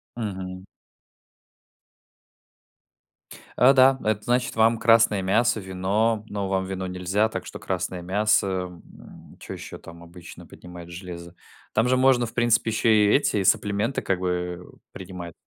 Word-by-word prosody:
Мгм. 95 -4 -6 2.9
А, 130 +2 +6
да, 135 0 +5
это 105 -1 -1
значит 125 +1 0
вам 115 +1 +3
красное 115 -3 +4
мясо, 110 +5 +1
вино, 100 +4 -1
но 100 -2 -4
вам 95 -1 0
вино 95 0 -5
нельзя, 90 +4 0
так - - -6
что - - -9
красное 90 -1 -4
мясо, 105 +3 +1
м. 90 -2 -8
Чё - - -8
еще - - -9
там 85 0 -13
обычно 85 0 -13
поднимает 90 -1 -12
железо? 85 -1 -9 0.4
Там 115 +3 +2
же 130 +1 +2
можно, 130 -2 +3
в 110 - -9
принципе, 115 -1 +2
еще 110 +1 +1
и 105 -1 +4
эти 105 -8 +1
саплименты, 100 +5 +1
как 95 -2 -1
бы, 90 0 -1 0.4
э, - - -20
принимать. 90 -3 -9
100 Hz, 145 wpm, -24 LUFS, 90-115 Hz, 2.9 s, А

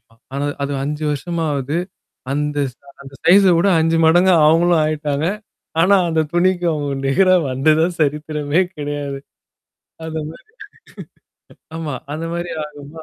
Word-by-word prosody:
ஆமா, 115 +1 -29 0.2
ஆனா 140 +1 -2 0.2
அது 140 0 -2
5 150 +2 -3
வருஷமாவது. 150 -2 -2 0.6
அந்த 150 +1 -2
ச - - -32 0.3
அந்த 135 0 -13
சைஸ 195 +3 +6
வுட 175 +4 +2
5 165 +1 +2
மடங்கா 175 +3 +5
அவங்களும் 165 +1 +4
ஆயிட்டாங்க. 150 -1 -1 0.5
ஆனா 195 +4 +5
அந்த 160 -1 +1
துணிக்கு 175 0 +1
அவங்க 145 -2 -3 0.2
நேரம் 185 +3 +3
வந்ததா 155 +5 +2
சரித்திரமே 150 +2 0
கெடையாது. 145 -1 -4 0.9
அத 160 0 -6 0.2
மாரி. 300 - -16 1.3
ஆமா. 155 -4 -4 0.2
அந்த 155 +2 -4
மாரி 170 0 -4
ஆகுமா? 150 +1 -11
155 Hz, 130 wpm, -19 LUFS, 145-170 Hz, 1.3 s, சைஸ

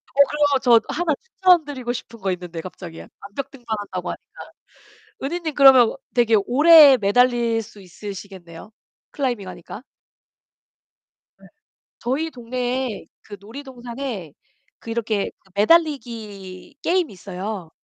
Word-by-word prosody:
어 280 - +6
그러면 295 -1 +2
저 235 -2 +6
1 320 -2 0
추천드리고 305 - +1
싶은 230 -1 -9
거 190 -2 -1
있는데 175 -2 -6
갑자기. 175 -2 -9 0.2
암벽 255 +7 -6
등반한다고 210 -8 -5
하니까. - - -9 1.0
은희님 320 +2 -3
그러면 265 -4 +6 0.2
되게 235 -3 +4
오래 295 +1 +8
매달릴 235 +2 +2
수 210 -1 -15
있으시겠네요. 190 -1 -10 0.4
클라이밍하니까. 205 - -5 1.6
네. - - -17 0.5
저희 275 +7 -2
동네에 250 -2 -3 0.2
그 205 - -10
놀이동산에 240 - -7 0.5
그 230 - -9
이렇게 225 -3 -1 0.2
매달리기 215 - 0
게임이 355 - 0
있어요. 190 -1 -6
235 Hz, 275 characters per minute, -22 LUFS, 200-275 Hz, 1.6 s, 오래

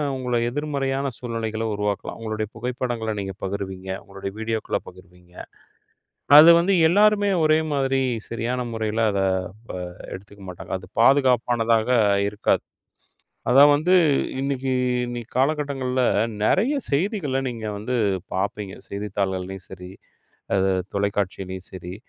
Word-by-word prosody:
உங்களை 125 -2 -1
எதிர்மறையான 140 -1 -2
சூழ்நிலைகளை 115 -2 -3
உருவாக்கலாம். 105 0 -3
உங்களுடைய 110 -1 -3
புகைப்படங்கள 120 -2 -3
நீங்கப் 95 -1 -6
பகிர்வீங்க. 95 -1 -5
உங்களுடைய 100 0 -7
வீடியோக்கள 110 0 -2
பகிர்வீங்க. 90 -1 -16 1.0
அது 160 +2 +10
வந்து 195 +3 +2
எல்லாருமே 205 +2 +4
ஒரே 155 0 +4 0.2
மாதிரி 135 -1 +1 0.3
சரியான 120 +2 -2
முறையில 110 0 0
அத 100 - 0 0.5
வ - - -3 0.4
எடுத்துக்க 100 +1 -10
மாட்டாங்க. 90 - -9
அது 95 0 -14
பாதுகாப்பானதாக 120 -4 +3 0.4
இருக்காது. 105 - 0 0.9
அதான் 140 +3 +8
வந்து 180 +5 +2 0.5
இன்னைக்கு 135 -1 -1 0.3
இன்னைக்கு 120 -1 -6
கால 135 +3 +4
கட்டங்கள்ல 130 -3 -1 0.4
நிறைய 240 +10 +2 0.2
செய்திகளை 150 - 0
நீங்க 115 -2 -6
வந்து 125 +5 -2 0.4
பாப்பீங்க. 100 +1 -3 0.2
செய்தித்தாள்களையும் 95 -2 -3
சரி, 90 +1 -9 0.6
ஆ, - - +4 0.4
தொலைகாட்சிலயும் 95 -2 -2
சரி, 90 -1 -7
115 Hz, 110 wpm, -23 LUFS, 100-135 Hz, 1.0 s, அது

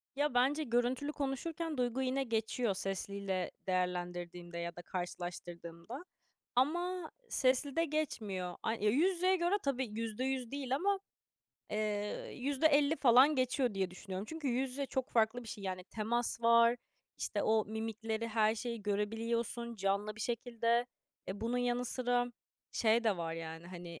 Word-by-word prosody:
Ya, 290 -2 +1
bence 275 +5 +3
görüntülü 245 +3 +1
konuşurken 305 +3 -2
duygu 250 +1 +1
yine 265 +1 +1
geçiyor 225 -1 0
sesliyle 195 0 -2 0.2
değerlendirdiğimde 175 -1 -2
ya 170 0 -3
da 175 - -7
karşılaştırdığımda. 175 - -6 0.5
Ama 345 +6 +1 0.2
seslide 275 +5 +2
geçmiyor. 210 - -2
A 220 - +1
ya, 210 -2 +1
yüz 345 - +4
yüzeye 370 +2 +3
göre 350 +3 +2
tabii 265 -3 0
%100 250 +2 -2
değil 270 -2 -1
ama, 395 +5 +2 0.7
eee, 210 -1 -2
%50 285 +3 +3
falan 260 +4 +7
geçiyor 255 -3 +1
diye 190 -2 0
düşünüyorum. 190 +2 -6
Çünkü 320 -2 -3
yüz 255 +2 +1
yüze 275 +1 -3
çok 260 -1 -2
farklı 230 +1 +2
bir 225 - -10
şey. 205 -3 -6
Yani, 185 -1 -3
temas 230 +3 -1
var, 235 +1 +6 0.4
işte, - - -1
o 220 -1 +3
mimikleri, 220 +1 -3
her 220 0 +3
şeyi 230 -1 -4
görebiliyorsun 230 +3 -1
canlı 200 +2 0
bir - - -8
şekilde. 235 0 +1 0.4
E, 195 +2 -4
bunun 240 +2 0
yanı 245 0 +1
sıra 245 0 0 0.4
şey 230 +1 +3
de 210 -4 +3
var, 165 -1 -2
yani, 165 +1 -6
hani, 175 -2 -8
235 Hz, 145 wpm, -34 LUFS, 200-265 Hz, 0.7 s, falan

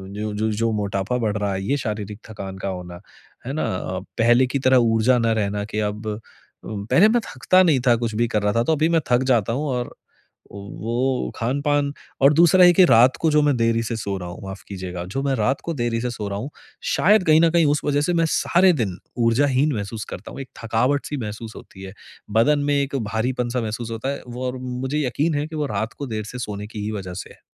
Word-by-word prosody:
जो 105 0 -3
जो 110 +1 0
जो 115 +2 0
मोटापा 100 +2 -1
बढ़ 110 -3 -1
रहा 100 -1 -1
है 95 0 -3
ये 140 +9 0
शारीरिक 105 -4 -5
थकान 95 -3 -7
का 95 - -5
होना, 90 -2 -7 0.5
है 135 - -4
ना? 155 - -1 0.5
पहले 120 +3 +4
की 135 +2 -2
तरह 130 0 +4 0.2
ऊर्जा 115 +3 +3
ना 115 -1 +1
रहना 100 0 -2
कि 105 0 -4
अब 105 +1 -9
अ, 105 0 -3 0.5
पहले 110 - +3
मैं 240 +1 +2
थकता 185 +8 +4
नहीं 155 -7 +3
था, 120 - +6
कुछ 115 -2 -3
भी 120 +2 +1
कर 105 -2 -1
रहा 105 0 +1
था 115 - +2
तो 160 - +1
अभी 155 +2 +1
मैं 165 -1 +2
थक 125 +1 +4
जाता 115 -1 +1
हूँ 145 +5 -2
और 125 0 -2
औ - - -16 0.6
वो 115 +6 -2
खान-पान 140 +4 0 0.3
और 140 +2 +6
दूसरा 175 +3 +6
है 175 - +7
कि 185 +1 +6
रात 125 -3 +5
को 160 - +3
जो 150 - +4
मैं 145 -2 +2
देरी 115 0 +1
से 115 +1 -3
सो 100 -2 -3
रहा 90 -2 -6
हूँ, 85 - -9
माफ़ 95 0 -8
कीजिएगा 90 -3 -6
जो 100 +9 -4
मैं 140 -1 +1
रात 130 +4 0
को 170 - -2
देरी 120 -4 -1
से 125 - -2
सो 105 -3 -5
रहा 100 0 -3
हूँ, 130 +7 -5 0.3
शायद 205 +1 +3
कहीं 155 0 +6
न 165 - +5
कहीं 170 -1 +3
उस 150 - -1
वजह 145 0 +1
से 175 +4 0
मैं 165 -1 +2
सारे 180 +3 +3
दिन 105 - -2 0.3
ऊर्जाहीन 135 +4 +2
महसूस 105 +1 -5
करता - - -8
हूँ। - - -9
एक 135 - -9
थकावट-सी 130 +6 0
महसूस 110 -1 -6
होती 95 - -12
है 95 -1 -8 0.5
बदन 145 +6 +4
में - - +3
एक 140 0 -3 0.2
भारीपन-सा 120 +2 -1
महसूस 115 +1 -4
होता 115 +4 -3
है - - -9
वो 125 +1 -5
और 125 +1 -4
मुझे 130 +4 -2
यकीन 150 +6 0
है 150 - -3
कि 160 - -9
वो 150 -1 -1
रात 110 +3 -2
को 140 - -5
देर 110 -3 -3
से 125 - -6
सोने 105 -3 -5
की 105 -1 -7
ही 110 - -2
वज़ह 95 -4 -5
से 90 - -7
है। - - -24
120 Hz, 240 wpm, -22 LUFS, 105-140 Hz, 0.6 s, है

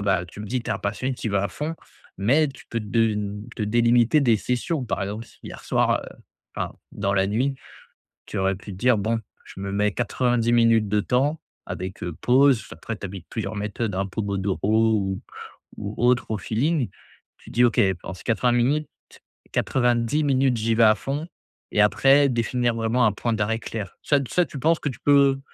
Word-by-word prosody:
bah 95 -3 +1
tu 90 +3 -11
me 105 - -6
dis 125 +4 -2
t'es - - -5
un 100 - -1
passionné, 120 +6 -2
tu 125 - -6
y - - -1
vas 100 0 +1
à - - -1
fond, 150 - -4 0.4
mais 140 +10 +3
tu 135 - -12
peux 115 - -2
de 110 +2 +1
n 105 0 -4
te - - -2
délimiter 120 +5 +3
des 120 -5 +4
sessions 125 - -2
par 110 - -2
exemple, 105 +4 -5
si - - -21
hier - - -9
soir - - +1 0.5
enfin - - -3 0.2
dans 100 -1 -1
la 95 -1 +2
nuit, 125 +7 0 0.7
tu 105 - -5
aurais 95 0 +1
pu 100 +2 -9
dire: 120 +6 +2
«Bon 110 +3 0 0.2
je - - -11
me 100 0 -4
mets 105 +1 +1
90 120 0 0
minutes 115 -2 +4
de 105 +1 +2
temps 135 +8 0 0.3
avec, 95 +1 -6
heu, 85 - -3
pause.» 130 -3 +4
Après 95 +8 -6
tu 100 - -6
appliques 95 -2 -9
plusieurs 110 -2 -4
méthodes, 105 0 -3
hein, 95 +1 -1
Pomodoro 100 +2 0
ou 95 -2 -1 0.6
ou 100 0 -5
autre 120 -1 +2
au 110 - 0
feeling. 130 - 0 0.5
Tu - - -15
dis: 120 - +3
«OK, 120 - +2 0.2
pendant - - -6
ces - - -13
80 120 +2 +1
minutes 135 +5 +1 0.6
90 120 +3 +1
minutes 135 -3 +2
j'y 115 +1 +1
vais 115 - +4
à 110 0 +6
fond» 140 +9 -4 0.4
et 105 - +3
après 135 +8 +5
définir 120 0 0
vraiment 115 +2 +1
un 110 - +4
point 115 +3 -2
d'arrêt 110 +1 0
clair. 105 -4 -6
Ça, 145 - +3
t 135 - -6
ça, 180 - +3
tu 150 - -9
penses 160 +4 +2
que 150 - -2
tu 130 - -8
peux 140 -1 +4
115 Hz, 200 wpm, -24 LUFS, 100-125 Hz, 0.7 s, à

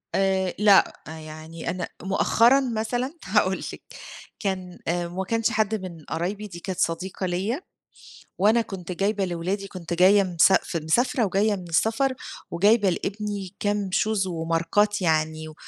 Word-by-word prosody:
آآ، 190 -1 +1
لأ، 205 -2 +5
يعني 160 +1 -8
أنا 180 +1 -3 0.2
مؤخرًا 230 +7 +4
مثلًا 245 +2 -2
هاقول 190 -1 +2 0.2
لِك - - -10 0.6
كان 185 -3 -4
آآ، 175 +1 0
ما 180 +2 -4
كانش 225 +4 0
حد 220 0 +1
من 180 -6 -7
قرايبي، 195 +6 -3
دي 175 -4 -9
كانت 185 0 -5
صديقة 185 +3 -1
ليَّ، 190 - -1 0.8
وأنا 220 +4 +4
كنت 190 -5 -7
جايبة 195 +2 0
لولادي، 185 +3 -3
كنت 175 -3 -6
جاية 190 +4 +5
مساف 180 0 +3
مسافرة 230 - +1
وجاية 205 +2 +1
من 180 -3 -9
السفر، 225 +10 +2 0.4
وجايبة 205 +4 +4
لإبني 200 0 -4
كام 205 -1 -1
shoes 215 -3 +1
وماركات 170 +5 0
يعني، 155 -2 0
و 155 - -10
190 Hz, 140 wpm, -25 LUFS, 170-210 Hz, 0.8 s, لأ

